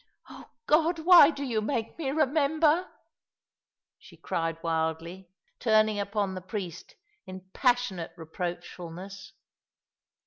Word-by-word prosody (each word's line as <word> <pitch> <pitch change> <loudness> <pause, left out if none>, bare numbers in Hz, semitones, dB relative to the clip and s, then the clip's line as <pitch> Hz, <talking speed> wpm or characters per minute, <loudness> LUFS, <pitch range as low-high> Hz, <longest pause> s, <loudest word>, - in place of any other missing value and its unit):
Oh - - -13 0.2
God! 325 +3 +3
why 325 -2 +8
do 285 -3 -5
you 235 -5 -1
make 225 -1 -3
me 285 -5 -2
remember?" 310 +3 +2 1.1
she - - -17
cried 165 -1 -3
wildly, 165 +3 -3 0.3
turning 215 -2 +3
upon 200 -1 -2
the 185 - -6
priest 185 -3 -7 0.3
in 185 0 -8
passionate 245 -10 0
reproachfulness. 175 +3 -7
210 Hz, 105 wpm, -28 LUFS, 175-280 Hz, 1.1 s, why